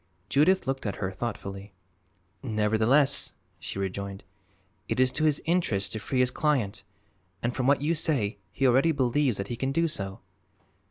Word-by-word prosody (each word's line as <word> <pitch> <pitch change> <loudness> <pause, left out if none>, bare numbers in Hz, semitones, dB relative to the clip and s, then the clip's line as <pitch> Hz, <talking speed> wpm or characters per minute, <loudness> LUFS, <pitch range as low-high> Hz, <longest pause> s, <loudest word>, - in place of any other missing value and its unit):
Judith 180 +7 +3
looked 135 -3 -2
at 100 - -2
her 95 -2 -3
thoughtfully. 100 -2 -6 0.7
"Nevertheless," 110 +6 +2 0.3
she 80 - -6
rejoined, 100 0 -4 0.6
"it - - -2
is 130 0 +4
to 155 - 0
his 150 -2 +3
interest 160 - +1
to 110 - -3
free 125 +4 0
his 125 0 +2
client, 130 -9 0 0.6
and 120 +1 0
from 130 -1 0
what 140 0 +3
you 160 +3 +2
say 130 -11 0
he 135 - -1
already 135 +6 +4
believes 130 -2 +1
that 100 0 -4
he 120 - -2
can 135 +3 -2
do 165 +4 +2
so." 95 -10 -4
125 Hz, 165 wpm, -27 LUFS, 100-145 Hz, 0.7 s, is